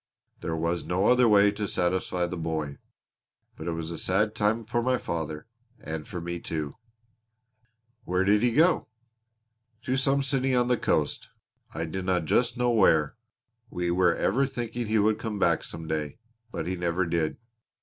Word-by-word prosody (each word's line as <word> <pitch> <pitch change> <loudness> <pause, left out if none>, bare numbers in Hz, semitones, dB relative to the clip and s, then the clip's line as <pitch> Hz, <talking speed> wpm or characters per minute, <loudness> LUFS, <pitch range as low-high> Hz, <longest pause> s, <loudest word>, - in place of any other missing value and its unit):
There 80 - -3
was 85 +2 -1
no 95 +3 0
other 125 0 +5
way 100 -1 +6
to 105 0 -3
satisfy 90 0 0
the 85 - -4
boy. 80 -4 -3 0.8
But 80 - -8
it 85 - -1
was 80 0 -4
a 85 - -5
sad 105 +4 +1
time 110 +1 0
for 120 +2 0
my 130 +1 +1
father 80 -6 -4 0.3
and 80 0 -6
for 90 - -5
me, 85 +1 -4
too." 75 -4 -4 1.3
"Where 90 -1 0
did 105 +2 +3
he 120 0 +3
go?" 165 +8 +3 1.0
"To 130 +1 0
some 135 +1 +2
city 135 -1 +1
on 125 0 +2
the 125 - +4
coast, 75 -8 -1 0.5
I 80 - -2
dinna 90 +2 -1
just 120 - +1
know 125 -1 +2
where. 80 -9 +3 0.5
We 90 -3 -2
were 90 -1 +3
ever 135 +7 +1
thinking 120 -2 -4
he 110 +1 +1
would 105 +1 +2
come 110 -2 -4
back - - +2
some 80 -1 -7
day 75 +1 -3 0.3
but - - -4
he 95 - -2
never 90 +1 0
did. 85 -2 -1
95 Hz, 170 wpm, -27 LUFS, 85-115 Hz, 1.3 s, way